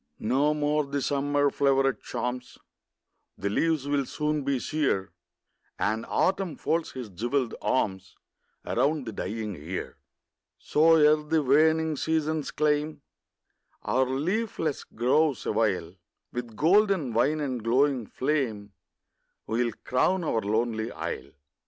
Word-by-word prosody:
No 140 +7 +1
more 150 0 +1
the 140 +1 -2
summer 145 +1 +1
floweret 135 -1 +2
charms, 125 +1 -4 0.8
The 100 +1 -2
leaves 155 +3 +1
will 140 -2 0
soon 150 0 -1
be 140 0 0
sere, 130 -9 -1 0.7
And 110 +3 -1
Autumn 190 -4 0
folds 165 0 -1
his 125 -3 -6
jewelled 120 +6 -1
arms 95 -6 -1 0.5
Around 140 +3 0
the 110 - -4
dying 105 +1 -4
year; 85 +3 -6 0.6
So, 165 +2 +4
ere 150 -1 +6
the 150 +1 0
waning 155 +3 +3
seasons 160 -1 -1
claim 150 0 0 0.8
Our 130 0 +1
leafless 160 - -1
groves 135 +4 +1
awhile, 95 -6 0 0.4
With 120 -2 -5
golden 185 - +3
wine 140 +7 +2
and 130 -6 -3
glowing 130 0 +2
flame 115 -8 -2 0.7
We 115 +3 0
'll - - -8
crown 180 +8 +1
our 115 -8 0
lonely 110 +1 -1
isle. - - -5
140 Hz, 120 wpm, -27 LUFS, 115-155 Hz, 0.8 s, ere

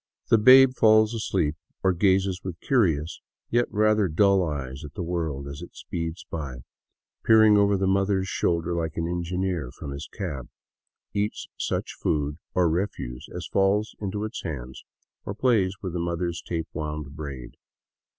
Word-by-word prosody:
The 115 - +6
babe 130 +3 +8
falls 110 -2 +5
asleep, 80 -9 0 0.3
or 95 -1 +4
gazes 95 0 +2
with 90 -3 -6
curious, 85 - +1 0.3
yet 120 +1 +3
rather 105 -1 +3
dull, 95 +3 +3
eyes 70 -3 -4
at 75 -1 -10
the - - -3
world 80 -5 -3
as 70 +3 -7
it 85 - -11
speeds 85 0 -5
by, 70 -7 -5 0.6
peering 110 -1 +6
over 100 -1 +4
the 95 - 0
mother's 95 0 +1
shoulder 85 -1 0
like 80 -2 -3
an 85 0 -1
engineer 90 -3 -2
from 70 - -8
his 70 +1 -7
cab, 75 - -5 0.6
eats 105 +1 -2
such - - -2
food 75 0 -1 0.2
or 90 -2 +4
refuse 80 -8 -3
as 90 -1 -6
falls 100 +2 +1
into 105 0 -3
its 110 +2 -5
hands, 65 -7 -6 0.4
or 100 - -5
plays 105 -6 +2
with 90 -3 -3
the 90 - -2
mother's 85 0 -2
tape 80 -2 -4
wound 75 -2 -5
braid. 70 -5 -7
90 Hz, 160 wpm, -26 LUFS, 75-100 Hz, 0.6 s, babe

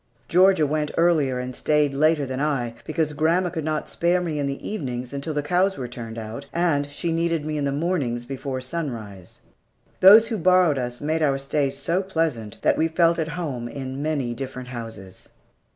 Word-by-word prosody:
Georgia 185 -2 +5
went 150 +1 -1
earlier 155 -7 +3
and 125 0 -5
stayed 150 -2 +2
later 150 +1 +3
than 130 0 -4
I, 135 -6 -1
because 155 -1 -1
grandma 165 +4 +1
could 160 -3 -4
not 155 0 -2
spare 175 +1 +1
me 165 -4 -2
in 140 - 0
the 140 0 -5
evenings 125 - -4
until 140 +3 -4
after 145 - 0
the - - -10
cows 185 +3 +2
were 130 -2 -4
turned 115 -2 -7
out, 115 +5 -7
and 160 -5 +1
she 165 +4 -3
needed 165 -2 0
me 155 0 -2
in 145 -1 -1
the 140 - 0
mornings 140 -6 -1
before 135 0 -4
sunrise. 120 - -6 0.6
Those 215 +4 +8
who 225 - -1
borrowed 180 -5 +4
us 125 -1 -4
made 155 +2 0
our 140 -3 +2
stays 135 0 -1
so 170 +6 0
pleasant 160 - -2
that - - +3
we 160 - +3
felt 165 +1 +2
at 160 - -1
home 135 -9 -3
in 130 +2 -6
many 145 -6 -1
different 125 0 -6
houses. 115 -6 -8
145 Hz, 195 wpm, -24 LUFS, 130-165 Hz, 0.6 s, Those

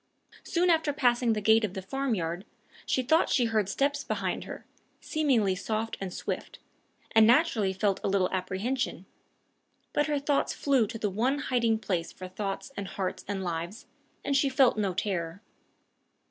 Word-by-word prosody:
Soon 355 +1 +2
after 320 -2 +2
passing 245 -4 +2
the 210 - -2
gate 220 +2 +5
of 200 -3 -2
the 190 - -3
farmyard, 190 -8 -2 0.4
she 260 - +1
thought 315 +7 +3
she 245 - +3
heard 215 -4 +1
steps 285 +5 0
behind - - -2
her, - - -8 0.3
seemingly 260 - +1
soft 220 +4 -2
and 190 -2 -3
swift, - - -5 0.5
and 220 -1 +6
naturally 235 -6 +3
felt 195 +1 0
a - - 0
little 195 -2 +2
apprehension; 195 +8 -2 0.9
but 295 - +2
her 295 -1 +1
thoughts 280 0 +1
flew 265 -6 +2
to 230 - -6
the 210 -2 -1
one 245 +8 +1
hiding 235 -5 +1
place 180 -6 -2
for 185 - -8
thoughts 195 +6 -4
and 200 -1 -4
hearts 190 -1 -4
and 195 -1 -3
lives, 175 +4 -4 0.4
and 280 - +1
she 275 0 +3
felt 260 -1 +4
no 200 -4 -1
terror. 185 -1 -2
220 Hz, 165 wpm, -28 LUFS, 190-270 Hz, 0.9 s, and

